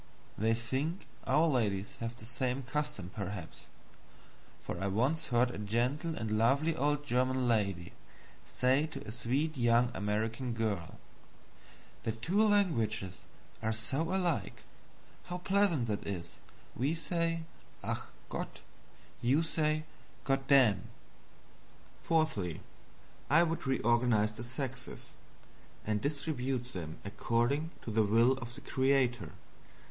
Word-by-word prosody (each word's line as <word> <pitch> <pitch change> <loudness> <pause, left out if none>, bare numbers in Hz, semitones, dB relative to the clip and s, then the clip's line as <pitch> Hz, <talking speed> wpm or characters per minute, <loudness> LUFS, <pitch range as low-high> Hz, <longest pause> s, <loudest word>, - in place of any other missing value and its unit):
They 110 +2 +2
think 135 - -2 0.2
our 155 +2 +5
ladies 105 -9 0
have 115 0 -3
the 110 - -11
same 125 +2 -1
custom, 130 -9 -3
perhaps; 100 -5 -6 0.9
for 90 - -5
I - - +1
once 130 +11 +1
heard 125 0 +2
a - - -6
gentle 125 - 0
and 110 -4 -1
lovely 140 +8 +3
old 145 0 +1
German 130 -1 +1
lady 100 -7 +1 0.5
say 130 +5 +2
to 155 - -8
a - - -4
sweet 135 +6 -1
young 120 0 +4
American 110 +5 -1
girl: 105 -7 -2 1.0
"The 110 - -1
two 170 - +1
languages 115 - +2 0.4
are 110 - 0
so 115 +6 -1
alike 180 -4 -1 0.6
how 180 - -4
pleasant 190 -7 +2
that 105 -3 -3
is; 85 -4 -5 0.4
we 140 +7 +1
say 165 0 -1 0.4
'Ach! - - -1 0.3
Gott!' - - -5 0.6
you 135 +7 +3
say 155 -1 +1 0.4
'Goddamn.'" 135 -5 +4 1.1
Fourthly, 155 - 0 0.7
I 165 +4 +6
would 165 -4 -2
reorganizes 120 -4 +3
the 120 - -5
sexes, 130 +1 -5 0.8
and 105 -1 0
distribute 135 -4 -2
them 80 -4 -5
accordingly 120 +9 0
to 115 - -4
the 110 +1 +3
will 115 +4 +5
of 120 -1 -7
the - - -10
creator. 130 - +1
125 Hz, 120 wpm, -33 LUFS, 110-150 Hz, 1.1 s, I